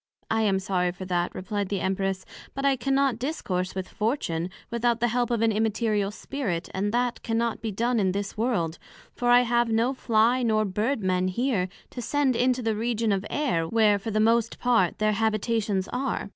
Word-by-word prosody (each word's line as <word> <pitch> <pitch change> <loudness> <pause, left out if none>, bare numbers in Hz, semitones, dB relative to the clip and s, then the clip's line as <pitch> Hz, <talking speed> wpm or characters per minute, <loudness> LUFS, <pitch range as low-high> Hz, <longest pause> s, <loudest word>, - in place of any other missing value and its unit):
I 225 0 +2
am 200 -3 +2
sorry 185 -2 0
for 185 +1 -8
that, 175 -1 -1
replied 200 +1 -3
the 200 - -1
Empress; 190 0 -1 0.3
but 275 0 -2
I 275 -1 +4
cannot 270 -1 +1
discourse 185 - -2
with 190 -1 -3
Fortune, 185 - -2 0.2
without 235 0 +1
the 240 0 +2
help 245 +1 0
of 235 -2 +1
an 225 - +3
Immaterial 215 -1 0
Spirit, 205 -5 -4
and 200 +2 -1
that 245 +1 0
cannot 230 0 -1
be 225 -2 -3
done 235 +4 0
in 190 -2 +2
this 200 +1 -3
World; 205 -8 -1 0.3
for 245 - -1
I 245 0 +7
have 240 -1 +1
no 230 +4 +2
Fly 235 0 +2
nor 215 -2 +2
Bird 215 +5 -1
men 185 0 +1
here, 195 -2 0 0.2
to 245 - -6
send 280 0 +1
into 250 +1 +1
the 225 -1 0
Region 225 0 0
of 195 -1 +1
the - - -10
Air, 210 - 0
where, 210 0 +3
for 210 - -5
the 215 0 0
most 230 +1 +2
part, 230 -8 +2
their 215 0 +2
Habitations 215 -2 0
are. 250 -4 -2
220 Hz, 200 wpm, -26 LUFS, 195-240 Hz, 0.3 s, I